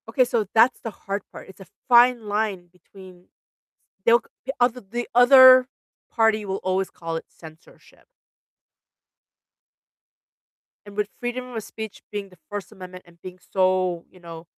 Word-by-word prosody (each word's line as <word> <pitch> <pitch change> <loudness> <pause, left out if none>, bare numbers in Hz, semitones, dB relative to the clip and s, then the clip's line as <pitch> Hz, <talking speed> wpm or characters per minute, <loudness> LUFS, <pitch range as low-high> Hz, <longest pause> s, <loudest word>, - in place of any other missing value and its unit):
Okay, 255 +3 +2
so 235 -3 -1
that's 230 +3 +4
the 225 - -5
hard 200 0 -6
part, - - -12
it's 190 - -15
a 190 - -13 0.2
fine 240 -2 +4
line 205 -4 -2
between 185 -1 -17 0.8
They'll 235 +1 +5
g 260 - -10
other 245 0 +1
The 235 +5 -6
other 255 +1 +7 0.4
party 220 -2 +1
will 190 0 -4
always 185 +1 -1
call 165 -1 -7
it - - -9
censorship 160 0 -17 2.8
and 205 0 -13
with 210 -1 0
freedom 250 +1 -5
of 225 -2 -5
speech 220 -1 -9
being 205 -1 -6
the 180 - -20
First 205 0 -7
Amendment 185 -3 -12
and 170 -1 -22
being 185 -1 -10 0.2
so, 185 -2 0
you 185 - -20
know 165 -1 -11
205 Hz, 150 wpm, -23 LUFS, 185-240 Hz, 2.8 s, other